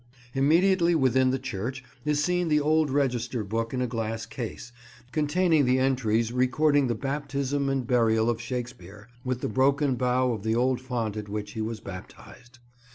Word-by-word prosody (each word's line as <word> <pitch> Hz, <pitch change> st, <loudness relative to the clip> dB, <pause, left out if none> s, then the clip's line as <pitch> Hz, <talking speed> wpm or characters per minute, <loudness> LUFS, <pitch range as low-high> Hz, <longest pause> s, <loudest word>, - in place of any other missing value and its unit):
Immediately 170 Hz, +5 st, +3 dB
within 130 Hz, -3 st, +3 dB
the 130 Hz, -, +1 dB
church 130 Hz, +4 st, -5 dB, 0.2 s
is 150 Hz, 0 st, +1 dB
seen 180 Hz, +1 st, +1 dB
the 150 Hz, -1 st, +3 dB
old 155 Hz, +1 st, +2 dB
register 125 Hz, -4 st, 0 dB
book 115 Hz, +3 st, -2 dB
in 125 Hz, -1 st, -1 dB
a -, -, -1 dB
glass 115 Hz, -1 st, -3 dB
case, 120 Hz, 0 st, -7 dB, 0.4 s
containing 155 Hz, +1 st, +2 dB
the 125 Hz, +1 st, +3 dB
entries 120 Hz, -4 st, +1 dB
recording 140 Hz, +3 st, +2 dB
the 120 Hz, -, 0 dB
baptism 140 Hz, +1 st, -2 dB
and 135 Hz, -2 st, -1 dB
burial 115 Hz, -2 st, +2 dB
of 120 Hz, -1 st, 0 dB
Shakespeare, 120 Hz, -4 st, -7 dB
with 130 Hz, -1 st, -2 dB
the -, -, -1 dB
broken 135 Hz, +4 st, +2 dB
bow 125 Hz, 0 st, +1 dB
of 110 Hz, -, -5 dB
the 110 Hz, +2 st, 0 dB
old 125 Hz, +1 st, +1 dB
font 120 Hz, -5 st, -3 dB
at 105 Hz, -1 st, -6 dB
which 105 Hz, 0 st, -4 dB
he 110 Hz, -, -5 dB
was 110 Hz, 0 st, -3 dB
baptised. 100 Hz, +5 st, -11 dB
125 Hz, 170 wpm, -27 LUFS, 115-140 Hz, 0.4 s, Immediately